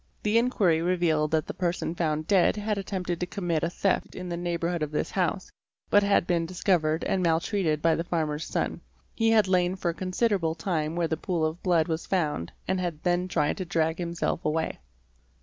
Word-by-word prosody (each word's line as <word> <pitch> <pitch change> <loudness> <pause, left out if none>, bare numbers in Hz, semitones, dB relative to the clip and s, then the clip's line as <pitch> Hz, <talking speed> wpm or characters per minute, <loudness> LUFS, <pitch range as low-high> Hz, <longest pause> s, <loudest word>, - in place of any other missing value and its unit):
The 215 +2 +4
inquiry 195 -9 +2
revealed 170 -3 +1
that 160 0 +1
the - - -5
person 175 -2 -1
found 155 -2 -1
dead 190 0 +4
had 210 -1 -1
attempted 180 -3 -3
to 180 - -2
commit 175 -5 -1
a 170 - 0
theft 190 +2 -1
in 180 -1 -6
the 170 - -2
neighbourhood 170 0 -2
of 150 - -1
this 150 - -2
house, 190 +1 -1 0.4
but 205 - +6
had 200 -3 +3
been 170 -2 0
discovered 170 -3 +1
and 190 - 0
maltreated 165 -1 +1
by 165 -1 +4
the 165 - -1
farmer's 155 -3 -2
son; - - -2 0.3
he 225 -1 +2
had 215 -3 +4
lain 180 -1 +2
for 190 -2 -2
a - - -1
considerable 185 -2 0
time 160 -2 -2
where 170 -1 +1
the 160 - -1
pool 170 -4 -1
of 155 +2 -3
blood 170 -4 +2
was 160 0 -3
found 150 - -1 0.2
and 190 0 0
had 170 -4 -3
then 180 0 +1
tried 150 -5 0
to 185 - -3
drag 165 -2 0
himself 170 -1 -2
away. 155 - -1
175 Hz, 200 wpm, -27 LUFS, 160-185 Hz, 0.4 s, but